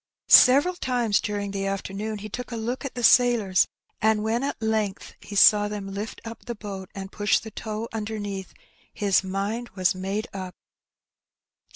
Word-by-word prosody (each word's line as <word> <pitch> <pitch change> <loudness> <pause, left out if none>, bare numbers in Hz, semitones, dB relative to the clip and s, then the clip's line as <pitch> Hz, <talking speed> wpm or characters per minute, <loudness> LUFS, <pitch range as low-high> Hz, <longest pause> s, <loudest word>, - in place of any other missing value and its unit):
Several 285 +8 +7
times 245 - +1
during 205 -1 -3
the 195 0 -2
afternoon 195 +2 -4
he 210 +1 -7
took 250 +4 -7
a - - -3
look 235 +4 -3
at 275 - -6
the 245 - -3
sailors^ 230 -7 +4 0.3
and 220 -1 +2
when 225 +2 0
at 280 +1 -3
length 220 -3 -2
he 205 - -9
saw 205 +1 +6
them 200 -2 -6
lift 205 +3 -5
up 230 0 -9
the 235 - -5
boat 195 -3 -7
and 195 0 -7
push 205 0 +2
the 220 - -7
tow 215 +1 -5
' - - -20
underneath^ 205 -3 -4 0.4
his 200 -2 +1
mind 200 +5 -3
was 185 -2 +2
made 195 +4 -3
up. 185 -1 -6
210 Hz, 175 wpm, -25 LUFS, 195-225 Hz, 0.4 s, Several